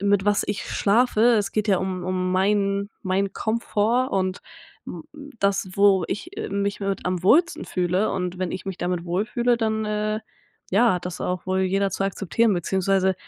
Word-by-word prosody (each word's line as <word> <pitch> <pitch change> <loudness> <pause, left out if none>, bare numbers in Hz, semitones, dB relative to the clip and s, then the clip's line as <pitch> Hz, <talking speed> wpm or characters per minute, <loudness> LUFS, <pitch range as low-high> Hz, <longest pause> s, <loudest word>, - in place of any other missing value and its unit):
mit 200 -1 +2
was 205 0 +2
ich 205 - -3
schlafe. 220 +2 +2 0.2
Es 205 -2 -1
geht 215 0 -1
ja 190 -3 +4
um 185 -1 -3
um 185 0 -1
meinen 200 +1 +1
meinen 190 +1 0
Komfort 230 +3 0
und 185 -1 -1 0.5
m 170 - -7 0.4
das, 200 -1 +1
wo 200 -3 +4
ich, 195 - -6
äh, - - -4
mich 200 0 -1
mit 195 -1 -2
am 180 -1 -1
wohlsten 325 - +3
fühle, 180 +3 0
und 180 -1 -3
wenn 185 -2 -2
ich 190 - -6
mich 190 -2 -4
damit 175 -1 -2
wohlfühle, 225 +7 0
dann, 220 -1 -1
äh, 215 0 -1 0.5
ja, 225 +2 +4
hat 180 - -4
das 180 - -6
auch 180 -1 -2
wohl 190 0 0
jeder 195 +1 +1
zu 195 - -2
akzeptieren, 200 +3 +1
beziehungsweise 190 +1 +1
195 Hz, 180 wpm, -24 LUFS, 185-210 Hz, 0.5 s, ja